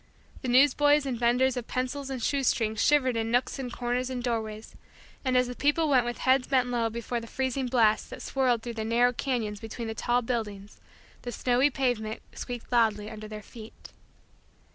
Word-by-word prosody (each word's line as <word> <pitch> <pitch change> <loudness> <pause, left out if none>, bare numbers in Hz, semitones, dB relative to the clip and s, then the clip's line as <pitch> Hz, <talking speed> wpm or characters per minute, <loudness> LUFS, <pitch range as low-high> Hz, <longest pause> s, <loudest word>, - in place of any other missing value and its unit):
The - - -4
newsboys 290 +3 +4
and 260 -3 -2
vendors 245 +2 +2
of 245 -2 -5
pencils 265 +2 -3
and 260 -3 -4
shoestrings 230 -5 +1
shivered 265 -4 +3
in 225 0 -1
nooks 245 +3 0
and 250 -2 -4
corners 245 +1 -2
and 250 -2 -4
doorways 220 -3 -3 0.5
and, 255 -2 +2
as 250 - +4
the 250 0 -6
people 295 +4 +2
went 260 -4 +4
with 240 - -3
heads 260 0 +2
bent 255 -3 +2
low 235 -2 0
before 235 +1 -3
the 230 - -9
freezing 260 +1 -2
blast 225 -4 +2
that - - -8
swirled 250 -4 +1
through 240 - -5
the - - -2
narrow 240 +2 +3
canyons 230 -6 -2
between 225 +2 -6
the 220 - -3
tall 240 +2 0
buildings, 210 -4 -4 0.4
the 245 - -5
snowy 250 +4 +2
pavement 245 -5 -2
squeaked 245 -1 -7
loudly 220 -3 +2
under 215 0 -8
their 215 0 -8
feet. 220 0 -13
245 Hz, 185 wpm, -28 LUFS, 225-260 Hz, 0.5 s, newsboys